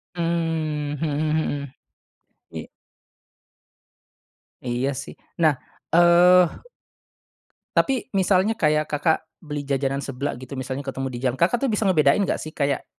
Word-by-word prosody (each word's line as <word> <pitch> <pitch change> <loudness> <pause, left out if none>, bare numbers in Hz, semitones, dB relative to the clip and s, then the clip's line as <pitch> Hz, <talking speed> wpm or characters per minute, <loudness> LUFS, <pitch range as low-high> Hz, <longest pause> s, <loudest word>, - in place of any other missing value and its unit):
Mmm, 165 -3 -1
mhm 160 - 0
mhm. 150 -2 -1 0.8
Iya. - - -7 2.0
Iya 125 +2 -1
sih, - - -10 0.2
nah, 160 -3 +4 0.4
eee 175 +1 +7 1.3
Tapi 265 -2 +1
misalnya 190 +3 +3
kayak 155 -6 +1
Kakak 160 +2 0 0.2
beli 150 -3 -5
jajanan 135 0 0
seblak 135 -1 -4
gitu, 130 +2 -10
misalnya 130 +1 -4
ketemu 135 0 -3
di 120 - -6
jalan, 130 0 0
Kakak 185 +8 +2
tuh - - +1
bisa 210 - 0
ngebedain 155 0 +4
nggak - - -1
sih 155 - -7
kayak, 140 -2 -1
150 Hz, 125 wpm, -23 LUFS, 140-170 Hz, 2.0 s, eee